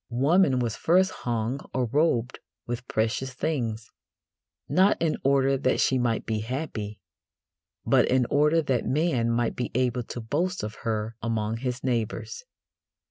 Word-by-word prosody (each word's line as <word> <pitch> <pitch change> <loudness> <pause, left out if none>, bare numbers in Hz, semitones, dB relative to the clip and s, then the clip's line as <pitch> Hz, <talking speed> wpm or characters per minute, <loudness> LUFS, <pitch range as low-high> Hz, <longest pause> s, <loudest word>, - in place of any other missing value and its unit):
Woman 140 +4 +3
was 120 -3 -1
first 185 +3 +3
hung 120 +2 -2 0.2
or 130 -1 +1
robed 125 -2 +1 0.3
with 120 +1 -5
precious 125 +4 -1
things, 115 -8 -2 0.8
not 190 +2 +3
in 165 -2 +1
order 135 0 +3
that 130 - +1
she 130 - +2
might 120 -2 0
be 110 -1 -1
happy, 110 -3 -4 0.9
but - - +4
in 130 -1 +3
order 150 +3 +3
that 130 -4 0
man 130 -3 +1
might 115 0 0
be 125 - -3
able 125 -1 +1
to 120 - -7
boast 170 +11 -2
of 105 0 -4
her 110 0 -2
among 110 -1 -1
his 125 +1 -4
neighbours. 125 - -2
125 Hz, 145 wpm, -26 LUFS, 115-140 Hz, 0.9 s, but